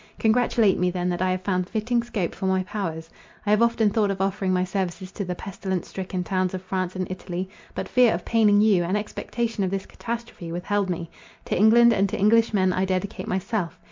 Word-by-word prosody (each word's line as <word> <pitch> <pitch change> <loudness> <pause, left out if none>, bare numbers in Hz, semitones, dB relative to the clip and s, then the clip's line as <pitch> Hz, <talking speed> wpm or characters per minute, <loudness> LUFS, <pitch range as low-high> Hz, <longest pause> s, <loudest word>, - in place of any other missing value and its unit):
Congratulate 225 -2 +3
me 180 0 +2
then 180 0 -1
that 175 0 -2
I 185 - +2
have 185 0 -1
found 185 -1 -1
fitting 235 +2 0
scope 215 -7 -3
for 190 - -3
my 190 0 +2
powers. 170 -5 -4 0.4
I 205 - +1
have 210 +1 +4
often 230 -2 +3
thought 210 -1 +2
of 195 -1 -2
offering 195 0 0
my 180 0 +2
services 185 0 -3
to 200 - -4
the 180 -1 -3
pestilence 190 -1 -4
stricken 185 -1 -4
towns 185 0 -1
of 185 - -6
France 185 -1 -2
and 185 0 -1
Italy; 185 0 -4 0.3
but - - -3
fear 250 -2 +4
of 175 - -7
paining 210 -3 +4
you, 205 -5 +4
and 185 +4 0
expectation 225 +1 -3
of 190 - 0
this 195 0 -3
catastrophe, 235 -7 -6
withheld 190 +3 -1
me. 170 -1 -4 0.3
To - - -1
England 230 +4 +6
and 195 -1 +2
to - - -3
Englishmen 210 -3 +3
I 185 - 0
dedicate 190 +1 -2
myself. 185 -2 -2
190 Hz, 210 wpm, -24 LUFS, 185-215 Hz, 0.4 s, England